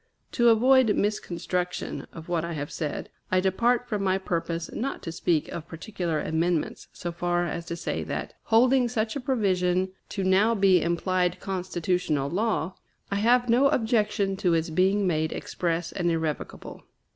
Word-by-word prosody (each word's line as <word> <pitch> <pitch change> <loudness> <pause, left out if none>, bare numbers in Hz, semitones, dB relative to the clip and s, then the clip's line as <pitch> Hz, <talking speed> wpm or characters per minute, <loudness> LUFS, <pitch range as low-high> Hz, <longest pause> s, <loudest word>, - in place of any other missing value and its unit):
To 240 -1 +4
avoid 245 0 +5
misconstruction 180 -3 -2
of 165 -1 -10
what 170 -2 0
I 170 0 -3
have 145 -2 -4
said, 150 -3 -4 0.2
I 185 - +4
depart 235 +6 +1
from 210 -4 -2
my 190 -1 +2
purpose 170 -2 -3
not 270 +5 -3
to 165 - -4
speak 165 -2 0
of 170 -1 -6
particular 165 -1 -3
amendments, 160 +1 -1
so 175 - -5
far 175 +1 0
as 170 -1 -4
to 170 - -3
say 170 - -3
that, - - -4
holding 245 +2 +4
such 220 -1 -1
a - - -1
provision 185 -7 +1 0.2
to 195 - -3
now 195 +5 +4
be 195 -4 +4
implied 180 +1 0
constitutional 180 -6 -1
law, 190 -2 0 0.4
I 200 - +1
have 240 +4 +3
no 245 +4 +5
objection 215 -6 +1
to 175 -3 +2
its 165 0 -1
being 190 +4 +2
made 160 -3 0
express 170 -1 -2
and 175 -2 0
irrevocable. 160 -2 -3
185 Hz, 160 wpm, -26 LUFS, 170-215 Hz, 0.4 s, avoid